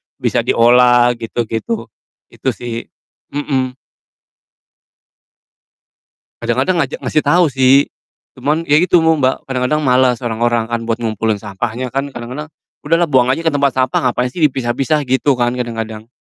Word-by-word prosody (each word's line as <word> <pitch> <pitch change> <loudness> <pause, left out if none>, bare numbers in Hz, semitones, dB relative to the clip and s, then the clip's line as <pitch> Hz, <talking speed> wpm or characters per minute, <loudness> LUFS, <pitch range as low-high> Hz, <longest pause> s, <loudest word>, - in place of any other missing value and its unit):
bisa - - 0
diolah, 120 +1 +5
gitu-gitu. 115 - -4 0.4
Itu - - -3
sih, 115 -1 -6 0.5
mhm. 130 -3 -1 2.7
Kadang-kadang 130 +10 0
ngaja 145 -2 -1
ngasih 155 - 0
tau 170 +1 +4
sih, 135 +1 +4 0.5
cuman 155 +3 0
ya 150 -1 +3
gitu 175 -1 +3
mum 160 -1 +3
Mbak, 130 -1 0
kadang-kadang 130 +4 0
males 125 -2 +2
orang-orang 120 0 0
kan 115 0 -1
buat 115 +1 -2
ngumpulin 110 0 0
sampahnya, 110 +5 -4
kan 135 +1 -3
kadang-kadang, 125 +6 -6 0.4
"Udahlah 165 0 +2
buang 130 -2 +4
aja 135 +6 0
ke 160 - +2
tempat 140 -2 +1
sampah, 130 0 +1
ngapain 125 +1 -1
sih 175 - -11
dipisah-pisah?" 135 +3 -1
Gitu 130 +1 +1
kan, 120 -1 +1
kadang-kadang? 115 -2 -5
130 Hz, 135 wpm, -16 LUFS, 120-145 Hz, 2.7 s, diolah